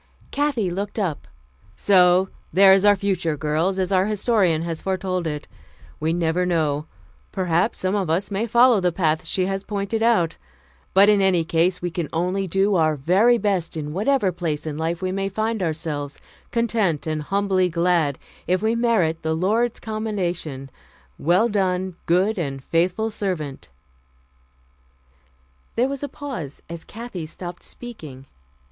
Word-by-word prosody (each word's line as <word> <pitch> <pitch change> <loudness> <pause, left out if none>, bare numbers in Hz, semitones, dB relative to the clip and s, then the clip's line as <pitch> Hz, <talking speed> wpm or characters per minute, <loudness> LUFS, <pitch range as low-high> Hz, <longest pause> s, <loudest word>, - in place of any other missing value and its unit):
Kathy 275 -10 0
looked 200 +4 -4
up. 180 -9 -2 0.5
"So 185 - +4 0.2
there 190 +3 +7
is 195 0 +4
our 205 0 +6
future, 180 -5 -1
girls, 160 +6 0
as 190 0 -1
our 190 0 +3
Historian 205 -6 +1
has 165 -1 -4
foretold 185 -2 -2
it. 150 -1 -5 0.5
We 155 +1 0
never 170 +1 +1
know. 155 -4 0 0.4
Perhaps 180 +2 0
some 185 +1 -1
of 195 -5 0
us 185 +5 0
may 205 +4 -1
follow 240 0 +5
the 180 -1 +1
paths 160 -3 0
she 185 - 0
has 195 +1 -2
pointed 205 +2 -2
out. 225 -8 +2 0.6
But 195 +1 +7
in 210 -1 +5
any 185 -3 +3
case 170 +3 +1
we 175 - -1
can 170 -3 -3
only 180 +4 -1
do 195 +3 +2
our 155 -3 +3
very 190 - +3
best 195 -6 -1
in 150 -1 -4
whatever 210 +1 +1
place 160 -4 -3
in 155 -2 -4
life 165 +3 -2
we 185 - 0
may 195 +1 -2
find 220 +2 -2
ourselves, 155 -4 -3 0.3
content 225 -9 0
and 155 -1 -2
humbly 190 +1 +1
glad 170 -4 +1 0.3
if 185 +3 +1
we 220 +1 +2
merit 220 -9 +1
the 160 0 -1
Lord's 220 +7 +1
commendation, 180 - -4 0.5
'Well 180 +9 +3
done, 190 -3 -1
good 190 +5 +2
and 135 -5 -4
faithful 180 +8 0
servant 165 -10 -4 1.1
'" 65 0 -37
There 245 +3 +2
was 275 0 -4
a 285 - -4
pause 245 - -7
as 170 -1 -7
Kathy 215 -8 -7
stopped 175 +2 -8
speaking. 155 - -9
180 Hz, 155 wpm, -23 LUFS, 160-205 Hz, 1.1 s, there